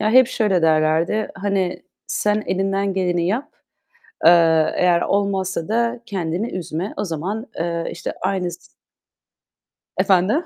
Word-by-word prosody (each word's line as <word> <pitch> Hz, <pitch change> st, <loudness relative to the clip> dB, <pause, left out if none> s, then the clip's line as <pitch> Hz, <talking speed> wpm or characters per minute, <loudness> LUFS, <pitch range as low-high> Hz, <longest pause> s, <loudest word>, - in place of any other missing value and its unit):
Ya, 215 Hz, -, +1 dB
hep 255 Hz, +2 st, +7 dB
şöyle 210 Hz, -8 st, +1 dB
derlerdi. 160 Hz, +6 st, +2 dB
Hani, 195 Hz, -2 st, -1 dB, 0.2 s
"Sen 210 Hz, 0 st, 0 dB
elinden 195 Hz, +1 st, 0 dB
geleni 175 Hz, -2 st, 0 dB
yap. 240 Hz, +10 st, -1 dB, 0.8 s
Eee, -, -, +10 dB, 0.5 s
eğer 175 Hz, -1 st, +3 dB
olmazsa 190 Hz, -4 st, -1 dB
da 235 Hz, +2 st, 0 dB
kendini 190 Hz, +1 st, -2 dB
üzme." 180 Hz, +2 st, -4 dB
O -, -, -1 dB
zaman, 195 Hz, -, -4 dB
eee, 170 Hz, 0 st, -2 dB
işte, -, -, -5 dB
aynı 185 Hz, -3 st, -1 dB
s -, -, -13 dB, 1.3 s
Efendim? 200 Hz, -, +2 dB
190 Hz, 125 wpm, -21 LUFS, 175-210 Hz, 1.3 s, Eee